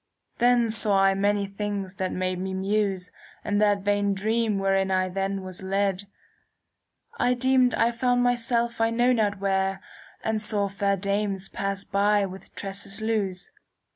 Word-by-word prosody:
" - - -47
Then 240 -1 +4
saw 210 -3 +3
I 195 0 +5
many 200 +1 +1
things 200 -1 -4
that 185 -1 -2
made 185 0 -2
me 190 0 -3
muse 195 -1 0 0.3
In 205 0 +1
that 205 -2 +2
vain 205 -1 +1
dream 220 +1 0
wherein 195 0 +1
I 185 0 +1
then 195 +1 -2
was 185 0 -6
led. 195 0 0 1.1
I 250 +1 +3
deemed 255 0 +3
I 230 +1 +2
found 245 +1 +1
myself 235 -1 0
I 225 - +3
know 240 +2 +3
not 210 -4 +1
where, 195 0 +1
*^ 195 - -13 0.4
And 220 -1 -1
saw 210 -2 0
fair 200 0 0
dames 200 0 -1
pass 195 0 -3
by 205 +1 +2
with 190 0 -10
tresses 195 +1 -6
loose. 210 -5 -2
200 Hz, 165 wpm, -26 LUFS, 195-220 Hz, 1.1 s, I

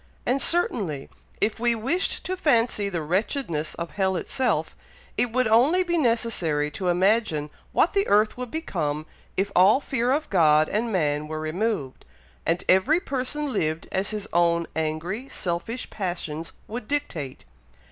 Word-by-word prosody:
And 265 +2 +1
certainly, 195 - 0 0.3
if 215 - +1
we 240 0 +2
wished 270 - -1
to 370 - -2
fancy 230 - +2
the 170 -5 -3
wretchedness 170 - -1
of 170 0 -5
hell 190 -2 0
itself, 255 +8 -1 0.4
it 245 - +1
would 255 0 +2
only 265 +12 +4
be 345 -1 -1
necessary 225 - +1
to 185 +4 -4
imagine 180 -4 +2 0.2
what - - +3
the 400 0 +2
earth 210 +1 +3
would 250 -1 -5
become 155 - -2 0.3
if 195 +1 0
all 195 +8 +6
fear 255 -3 0
of 300 +3 +1
God 155 -4 +5
and 225 +3 -1
man 150 -5 0
were 155 0 -4
removed, 155 - -2 0.4
and 170 +2 +1
every 190 - +4
person 280 -1 -3
lived 155 0 -1
as 190 +1 -1
his 210 -1 -4
own 170 0 +3
angry, 160 - -2
selfish 185 +8 -3
passions 170 -4 -4
would 230 0 -6
dictate. 175 - -3
200 Hz, 150 wpm, -25 LUFS, 165-250 Hz, 0.4 s, all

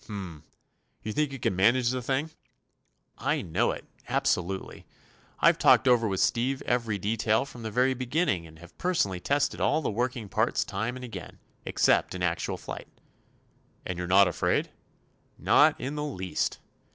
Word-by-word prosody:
"H - - -23
m. 95 -7 -7 0.6
You 110 - -4
think 150 +1 0
you 135 - -5
can 105 - -1
manage 120 +6 +3
the 130 0 -2
thing?" 135 +6 -1 0.9
"I - - 0
know 80 - +1
it—absolutely. 95 +2 -3 0.5
I've - - +4
talked - - +5
over 120 -3 +4
with 95 -2 -1
Steve 130 +3 +1
every 115 -4 0
detail 110 +4 +1
from 125 -3 -11
the 110 - -4
very 125 +4 +2
beginning, 130 - -1
and 80 0 -15
have 85 +1 -15
personally 165 - 0
tested 145 +8 0
all 155 - +2
the - - -1
working 120 0 -2
parts - - 0
time 110 +5 -3
and 130 0 -7
again, 120 - -9 0.3
except - - +2
in 90 - -4
actual 85 -1 -1
flight." - - -8 1.0
"And 90 -1 -4
you're 90 - -3
not 95 +2 +6
afraid?" 90 - 0 0.7
"Not - - +4
in 135 +3 -4
the 150 0 -3
least." 95 -11 -2
115 Hz, 165 wpm, -28 LUFS, 95-130 Hz, 1.0 s, not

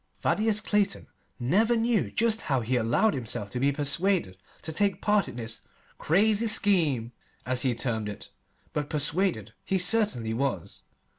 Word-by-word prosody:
Thaddeus 215 -1 +1
Clayton 210 -2 0 0.3
never 205 - +2
knew 230 -1 +1
just 225 -1 +1
how 135 -4 0
he 120 +3 -1
allowed 120 - +2
himself 110 -5 -4
to 125 - -3
be 140 +2 +2
persuaded 145 - +1 0.3
to 160 - -4
take 200 +4 +2
his - - -26
part 210 -1 +2
in - - -8
this 115 -2 -5 0.4
"crazy 210 +6 +2
scheme," 160 - +2 0.3
as 125 -1 0
he 125 -3 +1
termed 115 -3 -2
it, 100 - -9 0.4
but 145 -1 -3
persuaded 160 +5 0
he 190 - 0
certainly 180 - +1
was. 135 +3 -3
155 Hz, 155 wpm, -27 LUFS, 125-205 Hz, 0.4 s, never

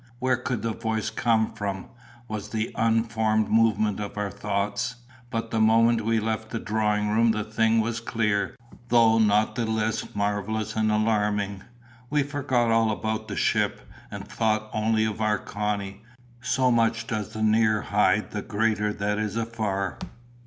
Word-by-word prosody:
Where 130 0 +1
could 125 -3 -3
the 115 -1 -1
voice 110 -1 -2
come 110 -2 +1
from?" 100 -3 -4 0.4
was 110 -2 -5
the 110 0 -2
unformed 110 -1 +1
movement 110 -2 +2
of 105 0 -6
our 105 -1 -2
thoughts. 105 +5 -2 0.3
But 115 -2 -3
the 115 - 0
moment 115 +1 +4
we 115 0 +2
left 110 0 -3
the 115 - -3
drawing 105 -1 0
room 115 +2 +3
the 110 -1 0
thing 110 +1 +2
was 115 +1 -2
clear, 105 -1 -1 0.3
though 115 -1 +5
not 105 0 +3
the 120 - -1
less 110 -1 -2
marvellous 105 +1 -1
and 110 -1 +1
alarming. 105 -2 0 0.5
We 150 -1 +2
forgot 130 -5 0
all 115 0 +3
about 110 0 -2
the - - -5
ship, - - 0 0.2
and - - -7
thought 110 -1 -1
only 110 0 +1
of 110 0 -3
our 105 -1 +2
Connie. 100 0 -4 0.4
So 125 0 +2
much 115 -1 +2
does 105 -3 -4
the 110 - -3
near 110 0 +3
hide 105 0 +1
the 105 - -3
greater 105 0 0
that 105 +1 -1
is 110 -1 -2
afar! 110 -4 -2
110 Hz, 160 wpm, -26 LUFS, 105-115 Hz, 0.5 s, though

